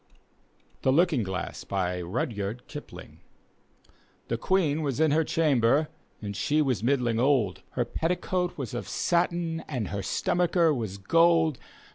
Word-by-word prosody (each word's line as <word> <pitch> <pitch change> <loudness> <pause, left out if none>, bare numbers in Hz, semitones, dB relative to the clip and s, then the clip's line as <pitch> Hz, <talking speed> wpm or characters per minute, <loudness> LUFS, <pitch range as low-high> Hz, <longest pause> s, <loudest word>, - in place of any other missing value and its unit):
THE 130 - +3
LOOKING 160 -2 +3
GLASS: 95 -2 -4
RiroYARD 100 +4 -2
kipunc 150 -1 -10 1.1
The - - 0
Queen 160 -5 +1
was 140 -3 -2
in 160 -2 +4
her 160 +2 +3
chamber, 145 -2 +2 0.3
and 100 -1 -4
^e 150 +9 +1
was 130 -6 0
middling 120 -2 +1
old. 125 -8 +2
Her 120 - 0
petticoat 180 +5 -1
was 130 -6 -5
of 120 - -4
satin, 170 -1 0
and 125 -9 -3
her 100 -1 -3
st<»nacher 170 - +1
was 110 -6 -4
gold. 165 - +3
140 Hz, 130 wpm, -27 LUFS, 115-165 Hz, 1.1 s, in